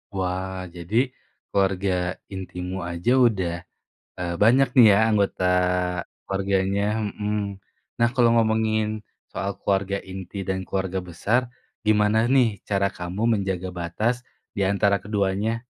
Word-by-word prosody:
Wah 95 Hz, 0 st, -2 dB
jadi, 85 Hz, +5 st, -6 dB, 0.6 s
keluarga 95 Hz, -1 st, +1 dB, 0.4 s
intimu 90 Hz, 0 st, -5 dB
aja 85 Hz, +8 st, 0 dB, 0.2 s
udah, 95 Hz, -6 st, -1 dB, 0.7 s
eee, 85 Hz, -1 st, -2 dB
banyak 130 Hz, +5 st, +5 dB
nih 120 Hz, -3 st, +9 dB
ya 100 Hz, -, +4 dB
anggota 100 Hz, -3 st, +1 dB, 0.8 s
keluarganya, 95 Hz, +1 st, 0 dB, 0.3 s
mhm. 105 Hz, -2 st, -3 dB, 0.4 s
Nah 120 Hz, -, +4 dB
kalau 120 Hz, -3 st, +4 dB
ngomongin, 110 Hz, -1 st, +1 dB, 0.3 s
soal 100 Hz, -, -2 dB
keluarga 100 Hz, 0 st, 0 dB
inti 95 Hz, +1 st, -7 dB
dan 95 Hz, 0 st, -1 dB
keluarga 95 Hz, -1 st, -2 dB
besar, 90 Hz, +7 st, 0 dB, 0.5 s
gimana 105 Hz, 0 st, +4 dB
nih 120 Hz, -7 st, +3 dB
cara 100 Hz, -1 st, +2 dB
kamu 90 Hz, +4 st, -4 dB
menjaga 95 Hz, -2 st, -2 dB
batas 105 Hz, +8 st, -1 dB, 0.3 s
diantara 100 Hz, 0 st, +2 dB
keduanya? 105 Hz, +3 st, -1 dB
100 Hz, 115 wpm, -24 LUFS, 95-110 Hz, 0.8 s, nih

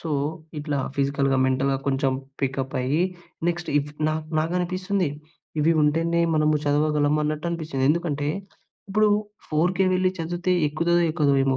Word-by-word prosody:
So, 165 Hz, -, -6 dB, 0.5 s
ఇట్లా 145 Hz, -1 st, -2 dB, 0.2 s
ఫిజికల్‌గా, 140 Hz, -1 st, +1 dB
మెంటల్‌గా 135 Hz, +1 st, +1 dB
కొంచెం 135 Hz, -1 st, +1 dB, 0.3 s
పికప్పయ్యి, 135 Hz, +2 st, 0 dB, 0.5 s
నెక్స్ట్ 175 Hz, 0 st, -2 dB
ఇఫ్ 145 Hz, +1 st, -3 dB, 0.2 s
నా 155 Hz, -, 0 dB, 0.2 s
నాకనిపిస్తుంది, 180 Hz, +2 st, 0 dB, 0.5 s
ఇవి 165 Hz, +3 st, +4 dB
ఉంటేనే 165 Hz, +3 st, +2 dB
మనము 155 Hz, 0 st, +3 dB
చదవగలము 150 Hz, 0 st, +2 dB
అన్నట్టనిపిచ్చింది. 155 Hz, -2 st, -2 dB
ఎందుకంటే, 150 Hz, -3 st, -1 dB, 0.6 s
ఇప్పుడు 215 Hz, +2 st, +3 dB, 0.4 s
4:00కే 175 Hz, +5 st, +2 dB
వెళ్ళి 185 Hz, 0 st, +2 dB
చదివితే, 175 Hz, +2 st, -1 dB, 0.2 s
ఎక్కుతదో 170 Hz, +3 st, +2 dB
ఎక్కదో 150 Hz, -4 st, +2 dB
ఏమో 135 Hz, -1 st, +2 dB
155 Hz, 120 wpm, -24 LUFS, 140-170 Hz, 0.6 s, ఇవి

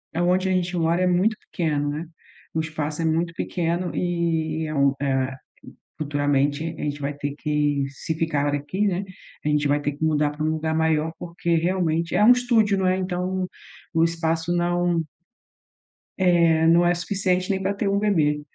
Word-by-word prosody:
aonde 180 Hz, +2 st, +2 dB
a -, -, +1 dB
gente 180 Hz, -1 st, 0 dB
mora 170 Hz, +1 st, +1 dB
é -, -, +3 dB
muito 185 Hz, +5 st, +2 dB, 0.2 s
pequeno, 150 Hz, -4 st, 0 dB
né. 150 Hz, +3 st, -4 dB, 0.5 s
O 160 Hz, -, 0 dB
espaço 155 Hz, 0 st, -4 dB
é 165 Hz, -, 0 dB
muito 165 Hz, +2 st, 0 dB
pequeno 170 Hz, +1 st, -2 dB
e 165 Hz, -3 st, -1 dB
é 155 Hz, -, -4 dB
um, 140 Hz, -1 st, +3 dB
eh, 135 Hz, -1 st, 0 dB, 0.7 s
futuramente, 145 Hz, 0 st, 0 dB
a -, -, -6 dB
gente 145 Hz, 0 st, -3 dB
vai 145 Hz, +1 st, -2 dB
ter 145 Hz, 0 st, -4 dB
que, 150 Hz, -2 st, 0 dB
se 140 Hz, +4 st, -4 dB
ficar 150 Hz, -3 st, 0 dB
aqui, 165 Hz, +9 st, -1 dB
né. 190 Hz, 0 st, 0 dB, 0.4 s
A 150 Hz, -, 0 dB
gente 150 Hz, -1 st, +2 dB
vai 145 Hz, +1 st, +2 dB
ter 145 Hz, 0 st, -1 dB
que 145 Hz, +3 st, -4 dB
mudar 150 Hz, -1 st, +2 dB
pra 150 Hz, +1 st, -4 dB
um 155 Hz, -, +1 dB
lugar 160 Hz, 0 st, -1 dB
maior, 160 Hz, 0 st, +1 dB
porque 170 Hz, 0 st, -2 dB
realmente, 170 Hz, -1 st, 0 dB
é -, -, +3 dB
um 245 Hz, -, +9 dB
estúdio, 235 Hz, -5 st, +2 dB
não 190 Hz, -, +1 dB
é, 185 Hz, -, +3 dB
então 185 Hz, 0 st, -2 dB, 0.5 s
o 165 Hz, 0 st, +4 dB
espaço 165 Hz, 0 st, -1 dB
não 175 Hz, 0 st, +1 dB, 1.2 s
É, 170 Hz, -3 st, +4 dB
não 170 Hz, +1 st, +5 dB
é 175 Hz, -, +4 dB
suficiente 185 Hz, 0 st, -1 dB
nem 190 Hz, -1 st, -1 dB
pra 195 Hz, +1 st, 0 dB
ter 200 Hz, 0 st, -1 dB
um 200 Hz, 0 st, +2 dB
bebê, 155 Hz, -8 st, +2 dB
165 Hz, 185 wpm, -24 LUFS, 150-180 Hz, 1.2 s, um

